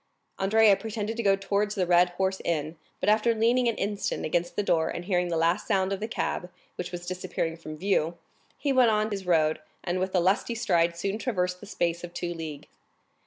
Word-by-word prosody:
Andrea 210 Hz, +1 st, +5 dB
pretended 220 Hz, +1 st, -4 dB
to -, -, 0 dB
go 200 Hz, -3 st, +4 dB
towards 200 Hz, +2 st, -1 dB
the 195 Hz, -, -1 dB
hotel 175 Hz, -, -4 dB
of -, -, +5 dB
the 180 Hz, -, -12 dB
Cheval 190 Hz, +2 st, 0 dB, 0.4 s
Rouge, 155 Hz, +3 st, -9 dB, 0.3 s
but -, -, -1 dB
after 220 Hz, +2 st, +3 dB
leaning 240 Hz, +3 st, +3 dB
an 230 Hz, -, +1 dB
instant 205 Hz, 0 st, -2 dB
against 175 Hz, +2 st, -1 dB
the 205 Hz, -, 0 dB
door, 160 Hz, -4 st, +2 dB
and 175 Hz, -, -5 dB
hearing 180 Hz, -2 st, +1 dB
the 170 Hz, -1 st, -1 dB
last 165 Hz, +2 st, +1 dB
sound 195 Hz, -2 st, +1 dB
of 195 Hz, -, -3 dB
the 215 Hz, -, -3 dB
cab, 180 Hz, -5 st, -2 dB, 0.3 s
which 180 Hz, 0 st, -5 dB
was 175 Hz, -1 st, -6 dB
disappearing 180 Hz, -2 st, -3 dB
from 155 Hz, -2 st, -9 dB
view, 170 Hz, -2 st, 0 dB, 0.4 s
he 280 Hz, -2 st, 0 dB
went 255 Hz, -3 st, +5 dB
on 215 Hz, 0 st, +1 dB
his 195 Hz, -2 st, -4 dB
road, 160 Hz, -3 st, +3 dB, 0.2 s
and 180 Hz, 0 st, -1 dB
with 185 Hz, +1 st, -2 dB
a -, -, +5 dB
lusty 190 Hz, +6 st, +1 dB
stride 170 Hz, -7 st, +1 dB
soon 195 Hz, +5 st, -2 dB
traversed 180 Hz, -7 st, -1 dB
the 205 Hz, -, -11 dB
space 170 Hz, -3 st, -1 dB
of 175 Hz, 0 st, -8 dB
two 175 Hz, 0 st, -3 dB
leagues. 160 Hz, -4 st, -8 dB
185 Hz, 220 wpm, -27 LUFS, 175-210 Hz, 0.4 s, Andrea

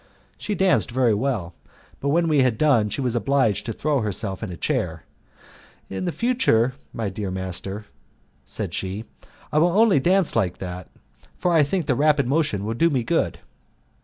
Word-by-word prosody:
She 210 Hz, -, -4 dB
danced 190 Hz, -5 st, +2 dB
very 120 Hz, -2 st, +2 dB
well, 105 Hz, -6 st, -2 dB, 0.5 s
but 140 Hz, -, -1 dB
when 170 Hz, +3 st, +2 dB
we 150 Hz, -3 st, +3 dB
had 125 Hz, -4 st, +2 dB
done 130 Hz, -9 st, +3 dB
she 140 Hz, -, -3 dB
was 125 Hz, -2 st, -1 dB
obliged 120 Hz, -2 st, +1 dB
to -, -, -1 dB
throw 145 Hz, +3 st, 0 dB
herself 100 Hz, -2 st, -2 dB
in 110 Hz, -5 st, -5 dB
a 85 Hz, -, -7 dB
chair. -, -, -2 dB, 0.9 s
"In 95 Hz, -1 st, -2 dB
future, 170 Hz, -, +2 dB, 0.2 s
my 115 Hz, -3 st, -3 dB
dear 100 Hz, 0 st, -4 dB
master," 95 Hz, +2 st, -5 dB, 0.6 s
said -, -, -5 dB
she, 95 Hz, +4 st, -4 dB, 0.5 s
"I 150 Hz, -, +3 dB
will 170 Hz, +2 st, +3 dB
only 220 Hz, -9 st, +5 dB
dance 185 Hz, +4 st, +3 dB
like 95 Hz, -6 st, +1 dB
that, 90 Hz, -1 st, -7 dB, 0.5 s
for 180 Hz, -, +1 dB
I 160 Hz, -, +5 dB
think 160 Hz, +4 st, 0 dB
the 135 Hz, -, +2 dB
rapid 145 Hz, 0 st, +2 dB
motion 135 Hz, -9 st, 0 dB
will 110 Hz, -, -2 dB
do 165 Hz, +9 st, +3 dB
me 130 Hz, -6 st, 0 dB
good." 115 Hz, -, 0 dB
125 Hz, 175 wpm, -23 LUFS, 100-155 Hz, 0.9 s, only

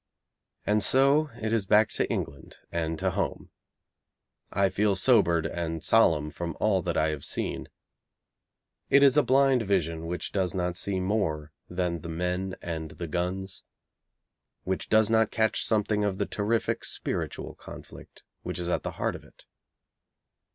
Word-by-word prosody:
And 105 Hz, +1 st, +2 dB
so 140 Hz, +6 st, +4 dB
it 110 Hz, 0 st, -2 dB
is 105 Hz, -4 st, 0 dB
back 105 Hz, +2 st, +5 dB
to -, -, -1 dB
England 70 Hz, -, -5 dB
and 80 Hz, -1 st, -2 dB
to -, -, 0 dB
home. -, -, -3 dB, 1.0 s
I 100 Hz, -1 st, +2 dB
feel 100 Hz, +1 st, +1 dB
sobered 95 Hz, -6 st, +3 dB
and 80 Hz, -2 st, -3 dB
solemn 80 Hz, -9 st, +3 dB
from 85 Hz, -1 st, -5 dB
all 100 Hz, -3 st, +2 dB
that 85 Hz, -2 st, -2 dB
I 80 Hz, 0 st, +2 dB
have 75 Hz, -3 st, -4 dB
seen. -, -, -3 dB, 1.2 s
It 140 Hz, -, +6 dB
is 140 Hz, -1 st, +6 dB
a 150 Hz, -, +6 dB
blind 135 Hz, 0 st, +3 dB
vision 85 Hz, -6 st, -1 dB
which 90 Hz, +1 st, -4 dB
does 95 Hz, -2 st, -1 dB
not 90 Hz, -1 st, -1 dB
see 95 Hz, +1 st, -1 dB
more 90 Hz, -7 st, -1 dB, 0.2 s
than 90 Hz, -1 st, -2 dB
the 85 Hz, -, -7 dB
men 90 Hz, +3 st, -2 dB
and 80 Hz, -2 st, -4 dB
the 85 Hz, -, -7 dB
guns, 90 Hz, +4 st, -3 dB, 1.0 s
which 95 Hz, 0 st, -3 dB
does 110 Hz, 0 st, +4 dB
not 110 Hz, -1 st, +4 dB
catch 110 Hz, -1 st, +1 dB
something 105 Hz, -1 st, +1 dB
of 100 Hz, -2 st, -1 dB
the -, -, 0 dB
terrific 110 Hz, +2 st, -1 dB
spiritual -, -, -3 dB
conflict -, -, -12 dB, 0.2 s
which 90 Hz, -2 st, -5 dB
is 90 Hz, -1 st, -3 dB
at -, -, 0 dB
the -, -, -5 dB
heart -, -, -1 dB
of -, -, -10 dB
it. -, -, -19 dB
95 Hz, 160 wpm, -27 LUFS, 85-110 Hz, 1.2 s, It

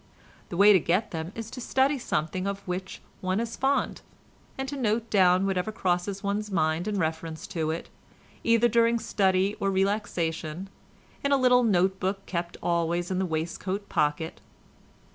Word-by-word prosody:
The 170 Hz, -, -5 dB
way 205 Hz, +2 st, +8 dB
to 190 Hz, -, +6 dB
get 185 Hz, +7 st, 0 dB
them 160 Hz, +1 st, -4 dB
is 225 Hz, 0 st, -6 dB
to 255 Hz, -, -7 dB
study 265 Hz, +3 st, +2 dB
something 185 Hz, -2 st, -2 dB
of 200 Hz, 0 st, -4 dB
which 185 Hz, +1 st, -5 dB, 0.2 s
one 185 Hz, +2 st, 0 dB
is 230 Hz, 0 st, -3 dB
fond, 275 Hz, +1 st, 0 dB, 0.6 s
and 265 Hz, 0 st, -3 dB
to 285 Hz, -, -4 dB
note 230 Hz, -3 st, -1 dB
down 185 Hz, -1 st, +4 dB
whatever 190 Hz, +1 st, 0 dB
crosses 190 Hz, -1 st, -1 dB
one's 205 Hz, +1 st, -1 dB
mind 160 Hz, -1 st, 0 dB
in 210 Hz, -1 st, -1 dB
reference 160 Hz, -1 st, -3 dB
to 160 Hz, -3 st, -1 dB
it, 160 Hz, +1 st, -3 dB, 0.6 s
either 230 Hz, +1 st, +4 dB
during 235 Hz, 0 st, +3 dB
study 195 Hz, -2 st, +1 dB
or 195 Hz, -, +1 dB
relaxation, 190 Hz, -3 st, -1 dB, 0.5 s
in 280 Hz, -, +1 dB
a 280 Hz, -, +5 dB
little 250 Hz, -1 st, +5 dB
note 190 Hz, -3 st, +2 dB
book 195 Hz, +1 st, -2 dB
kept 170 Hz, -1 st, -4 dB
always 170 Hz, +1 st, 0 dB
in 185 Hz, -, 0 dB
the 190 Hz, -, 0 dB
waistcoat 180 Hz, +5 st, -3 dB
pocket. 150 Hz, +2 st, -1 dB
190 Hz, 165 wpm, -27 LUFS, 175-215 Hz, 0.6 s, way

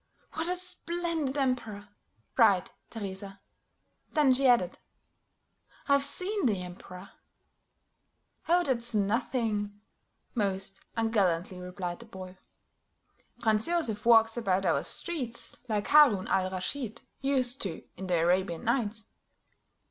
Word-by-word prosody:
"What 325 Hz, +2 st, -2 dB
a 360 Hz, -, 0 dB
splendid 340 Hz, -5 st, +1 dB
emperor!" 230 Hz, -7 st, -2 dB, 0.5 s
cried -, -, +4 dB, 0.2 s
Teresa. 195 Hz, -2 st, -7 dB, 0.7 s
Then 295 Hz, -5 st, +4 dB
she 265 Hz, +1 st, +2 dB
added, 230 Hz, -8 st, +2 dB, 1.1 s
"I've 280 Hz, -1 st, +4 dB
seen 370 Hz, +5 st, +2 dB
the 195 Hz, -5 st, -1 dB
Emperor." 180 Hz, +1 st, -11 dB, 1.4 s
"Oh, 350 Hz, +1 st, +4 dB
that's 235 Hz, -5 st, 0 dB
nothing," 210 Hz, -1 st, -1 dB, 0.5 s
most 195 Hz, -3 st, -2 dB, 0.2 s
ungallantly 190 Hz, -6 st, 0 dB
replied 180 Hz, -1 st, -6 dB
the 235 Hz, -, -13 dB
boy. 185 Hz, -3 st, -10 dB, 1.0 s
"Franz 220 Hz, -2 st, +2 dB
Joseph 275 Hz, -12 st, +1 dB
walks 225 Hz, -1 st, +5 dB
about 195 Hz, -5 st, 0 dB
our 170 Hz, -, +2 dB
streets 255 Hz, -9 st, -2 dB
like 210 Hz, -1 st, -1 dB
Haroun 275 Hz, -11 st, +6 dB
al 185 Hz, -1 st, +1 dB
Raschid 220 Hz, +5 st, -5 dB, 0.2 s
used 265 Hz, -2 st, 0 dB
to 180 Hz, -5 st, -4 dB
in 190 Hz, +1 st, -7 dB
the 180 Hz, -2 st, +1 dB
Arabian 175 Hz, 0 st, +1 dB
Nights. 220 Hz, -3 st, -1 dB
220 Hz, 110 wpm, -29 LUFS, 190-265 Hz, 1.4 s, Haroun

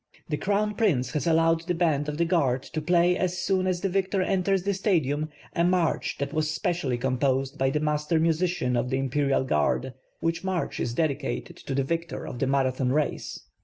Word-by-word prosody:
The 150 Hz, -, 0 dB
Crown 205 Hz, +6 st, 0 dB
Prince 155 Hz, -, +1 dB
has 150 Hz, +2 st, -2 dB
allowed 165 Hz, 0 st, +3 dB
the 180 Hz, -, 0 dB
band 155 Hz, -4 st, +1 dB
of 150 Hz, -, -4 dB
the 170 Hz, -, +2 dB
Guard 140 Hz, -7 st, +1 dB
to 155 Hz, -, -5 dB
play 175 Hz, +2 st, +3 dB
as 180 Hz, -1 st, -1 dB
soon 185 Hz, 0 st, +1 dB
as 180 Hz, -1 st, 0 dB
the 195 Hz, -, +1 dB
victor 190 Hz, 0 st, 0 dB
enters 190 Hz, 0 st, +1 dB
the 200 Hz, +1 st, 0 dB
Stadium, 155 Hz, -7 st, 0 dB, 0.2 s
a 170 Hz, -, +1 dB
march 175 Hz, -2 st, +1 dB
that 140 Hz, +1 st, -3 dB
was 155 Hz, -1 st, 0 dB
specially 155 Hz, -, -1 dB
composed 130 Hz, +1 st, 0 dB
by 135 Hz, 0 st, +3 dB
the 150 Hz, -, 0 dB
master 150 Hz, +1 st, +1 dB
musician 165 Hz, -5 st, +1 dB
of 120 Hz, +1 st, 0 dB
the 130 Hz, -, 0 dB
Imperial 135 Hz, +1 st, +1 dB
Guard, 125 Hz, -, 0 dB, 0.3 s
which 165 Hz, +2 st, -1 dB
march 190 Hz, -2 st, -2 dB
is 120 Hz, -, -2 dB
dedicated 145 Hz, -3 st, -2 dB
to 135 Hz, -, -5 dB
the 135 Hz, -, +2 dB
victor 165 Hz, +4 st, -3 dB
of 120 Hz, -, -6 dB
the 135 Hz, -, +1 dB
Marathon 130 Hz, -1 st, +1 dB
race. 150 Hz, +1 st, -1 dB
155 Hz, 200 wpm, -26 LUFS, 135-180 Hz, 0.3 s, allowed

